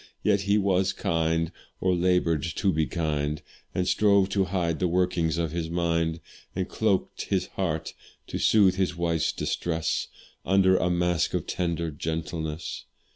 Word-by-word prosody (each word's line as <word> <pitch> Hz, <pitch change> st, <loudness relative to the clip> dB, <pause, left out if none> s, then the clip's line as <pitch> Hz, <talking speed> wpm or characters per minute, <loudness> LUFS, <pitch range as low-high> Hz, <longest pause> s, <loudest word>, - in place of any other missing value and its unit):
Yet 100 Hz, -2 st, +3 dB
he 105 Hz, -, +5 dB
was 95 Hz, -1 st, +2 dB
kind, 80 Hz, 0 st, 0 dB, 0.3 s
or 95 Hz, 0 st, +2 dB
laboured 90 Hz, -3 st, +2 dB
to 90 Hz, +4 st, 0 dB
be 80 Hz, 0 st, +1 dB
kind, 75 Hz, -3 st, -1 dB, 0.4 s
And 90 Hz, 0 st, 0 dB
strove 100 Hz, -2 st, +4 dB
to 100 Hz, -1 st, +1 dB
hide 90 Hz, -4 st, -1 dB
the 90 Hz, -, +2 dB
workings 85 Hz, -2 st, +1 dB
of 85 Hz, -3 st, -1 dB
his 80 Hz, -1 st, -3 dB
mind; 85 Hz, -1 st, 0 dB, 0.3 s
And 95 Hz, 0 st, -1 dB
cloak'd 105 Hz, -4 st, 0 dB
his 95 Hz, -2 st, 0 dB
heart, 85 Hz, -5 st, -2 dB, 0.3 s
to -, -, -5 dB
soothe 95 Hz, -4 st, +4 dB
his 95 Hz, -2 st, 0 dB
wife's 85 Hz, -2 st, 0 dB
distress, 80 Hz, -2 st, -1 dB, 0.4 s
Under 95 Hz, 0 st, +4 dB
a 90 Hz, -, +1 dB
mask 90 Hz, -2 st, +1 dB
of -, -, -1 dB
tender 85 Hz, -2 st, -2 dB
gentleness. 80 Hz, +1 st, -4 dB
85 Hz, 150 wpm, -26 LUFS, 80-95 Hz, 0.4 s, he